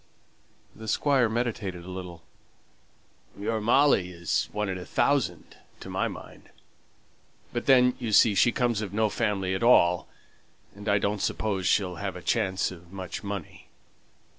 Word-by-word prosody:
The 110 0 -10
Squire 130 +1 +2
meditated 110 -6 -3
a 95 - -8
little. 90 -3 -8 1.2
"Your 110 +2 -2
Molly 120 -4 +3
is 85 -1 -2
one 105 0 -2
in 95 -1 -3
a - - -7
thousand, 110 - -1 0.2
to - - -9
my - - 0
mind. - - -11 1.0
But 120 - -3
then, 125 -2 +6
you 120 -3 -3
see, 105 0 +6
she 110 +5 +4
comes 120 -4 0
of 100 -3 -5
no 110 0 +2
family 100 -4 -1
at 95 - -2
all, 90 -7 +4 0.7
and 105 +1 -6
I 100 - +4
don't 100 0 -1
suppose 95 -4 -1
she'll 90 -3 +1
have 95 0 -4
a 90 - -8
chance 95 +5 0
of 85 -1 -13
much 95 0 -6
money." 100 -4 -7
100 Hz, 155 wpm, -27 LUFS, 90-115 Hz, 1.2 s, then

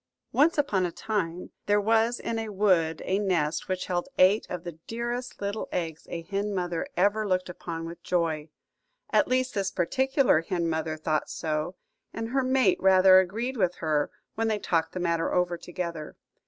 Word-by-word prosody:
ONCE 310 +4 +3
upon 210 -11 +2
a 175 - -1
time 180 -4 -3 0.2
there 205 0 +4
was 225 +3 +2
in 230 -1 -2
a 225 -1 -4
wood 185 -6 +2
a 190 +2 +1
nest 170 -6 0
which 185 -1 -2
held 175 +5 -2
eight 190 +4 +4
of 180 -2 -5
the 170 -3 -8
dearest 240 +2 -4
little 205 +1 -3
eggs 165 -3 -4
a 170 -1 -5
hen 200 +3 -2
mother 175 -2 -2
ever 205 +3 +2
looked 185 -1 0
upon 165 -2 -6
with 170 +1 -8
joy. 160 -4 -1 0.6
At - - +4
least 255 0 +1
this 195 -2 0
particular 265 - +2
hen 170 0 -2
mother 160 -1 -2
thought 155 0 -1
so, 155 +3 -2 0.4
and 225 0 -3
her 270 +2 +1
mate 260 0 +3
rather 190 0 +7
agreed 230 +8 -2
with 180 -4 +1
her 155 -2 0 0.2
when 225 +1 -1
they 215 -1 +1
talked 165 -5 0
the 185 - -3
matter 170 -1 0
over 180 -1 +1
together. 170 -3 -6
185 Hz, 180 wpm, -27 LUFS, 165-215 Hz, 0.6 s, rather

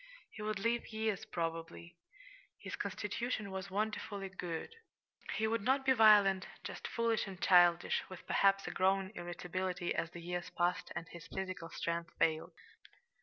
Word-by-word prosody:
He 215 - -9
would 215 -1 -1
live 230 +4 0
years, 220 -1 -1
probably. 165 -1 -4 0.6
His - - -6
constitution 210 +1 -3
was 190 0 -5
wonderfully 200 -1 -2
good. 180 - -5 0.6
He 220 - +1
would 225 0 +1
not 265 +5 +2
be 265 - +5
violent 205 -5 +6 0.2
just - - -5
foolish 230 -2 0
and 190 -2 -8
childish, 175 -2 +5
with 185 -1 -10
perhaps 195 0 +3
a - - -3
growing 190 +1 +2
irritability 180 0 -3
as 165 - -1
the 175 0 -9
years 175 0 -3
passed 175 +1 0
and 170 -1 -4
his 170 -1 -10
physical 185 -3 -5
strength 170 0 -2
failed. 160 -1 +1
190 Hz, 150 wpm, -35 LUFS, 175-215 Hz, 0.6 s, violent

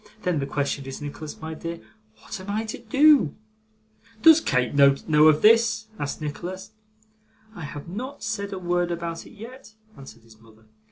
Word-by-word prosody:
Then, 180 -4 0
the 140 - -3
question 140 0 -2
is, 135 - -7
Nicholas 150 +1 -8
my 160 0 -6
dear, 165 +1 -6 0.4
what 110 - -8
am 190 +2 -9
I 215 +2 -1
to 220 - -6
do?' 275 - +4 0.9
'Does 320 -1 +8
Kate 130 - 0
know 140 -1 +6 0.3
of 155 -1 +4
this?' 220 0 +4
asked 145 +1 -4
Nicholas. 185 +7 -6 0.8
'I 175 - -8
have 145 +1 -8
not 255 +10 -7
said 200 -2 -3
a 195 - -4
word 175 -1 -1
about 170 -1 -5
it - - -15
yet,' 230 0 -12 0.2
answered 115 -4 -13
his 110 -1 -19
mother. 110 -1 -21
170 Hz, 170 wpm, -24 LUFS, 145-215 Hz, 0.9 s, Does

